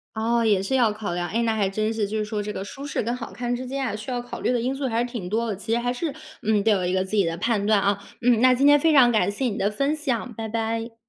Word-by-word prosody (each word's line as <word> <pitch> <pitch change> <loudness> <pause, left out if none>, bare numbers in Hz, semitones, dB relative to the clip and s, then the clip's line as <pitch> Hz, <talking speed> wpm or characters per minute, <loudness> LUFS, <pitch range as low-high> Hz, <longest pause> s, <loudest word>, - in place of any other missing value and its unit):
哦， 230 +1 +1
也 205 -4 +3
是 265 +7 0
要 235 -4 +3
考 210 -4 -5
量。 175 0 -2
诶， 230 +6 0
那 225 -1 +1
还 200 -3 +1
真 215 +3 -1
是， 220 -2 -1
就 210 +2 -4
是 215 - 0
说 210 0 -3
这 210 0 -4
个 195 - -5
舒 275 +7 -8
适 285 - -2
跟 235 +2 -2
好 240 - -8
看 245 0 -2
之 255 +1 -5
间 270 +1 -3
啊， 215 -4 -2
需 215 +4 -6
要 245 - -2
考 245 - -8
虑 - - +1
的 245 - +1
因 250 +3 -1
素 270 0 -3
还 230 -2 0
是 - - +1
挺 235 -7 -5
多 230 +4 -1
的。 210 - -2
其 220 +4 -4
实 235 - +3
还 245 +1 -1
是， 290 +4 -3 0.3
嗯， 210 -1 +2
得 225 - +3
有 195 -4 +2
一 180 - 0
个 185 0 +1
自 190 +3 -3
己 200 - +4
的 165 0 -2
判 210 +2 0
断， 210 -1 +4
啊。 200 0 +1 0.2
嗯， 240 -2 +4
那 255 +1 +6
今 260 +3 +1
天 290 +1 +7
非 320 +2 +3
常 255 -4 +7
感 215 -5 +2
谢 230 +6 -2
你 215 -4 -2
的 200 - +2
分 275 +8 0
享， 255 -5 -2
拜 220 +1 -5
拜。 225 +1 -2
225 Hz, 350 characters per minute, -24 LUFS, 210-245 Hz, 0.3 s, 天